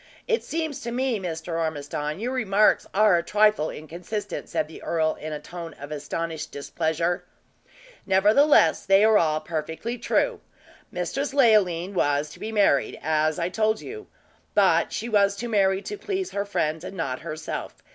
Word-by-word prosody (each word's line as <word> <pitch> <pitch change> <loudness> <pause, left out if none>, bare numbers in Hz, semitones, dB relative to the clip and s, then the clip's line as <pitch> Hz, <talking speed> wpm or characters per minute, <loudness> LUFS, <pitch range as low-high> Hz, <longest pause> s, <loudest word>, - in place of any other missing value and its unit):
It 460 -2 +1
seems 315 -3 -3
to 235 - -4
me, 250 -2 0
Mr. 165 -2 -4
Ormiston, 150 0 -3
your 240 +4 -2
remarks 215 -4 +3
are 200 -3 +4
a - - -4
trifle 210 -4 +3
inconsistent," 180 +6 -6
said - - -1
the 160 - -12
earl, 160 -1 0
in 155 - -6
a 150 - -4
tone 170 -2 -8
of 145 +2 -10
astonished 155 +2 -4
displeasure. 160 +4 -1 0.8
"Nevertheless, 205 - +5
they 195 +1 +5
are 220 -1 +6
all 155 -2 +1
perfectly 165 +9 -4
true. - - 0 0.5
Mistress 280 0 -3
Leoline 200 -8 +3
was 145 -4 +1
to - - -13
be 220 - -5
married, 200 -10 +2
as 155 0 +1
I 170 0 -1
told 220 +2 +1
you; 430 0 -8 0.5
but - - +4
she 230 - -3
was 200 -3 +3
to 235 +4 -5
marry 195 -3 +2
to 415 -1 -6
please 385 -2 -3
her 200 0 -2
friends, 160 -5 -1
and 190 +1 -7
not 130 -6 -2
herself. 155 -1 -6
185 Hz, 165 wpm, -25 LUFS, 160-215 Hz, 0.8 s, are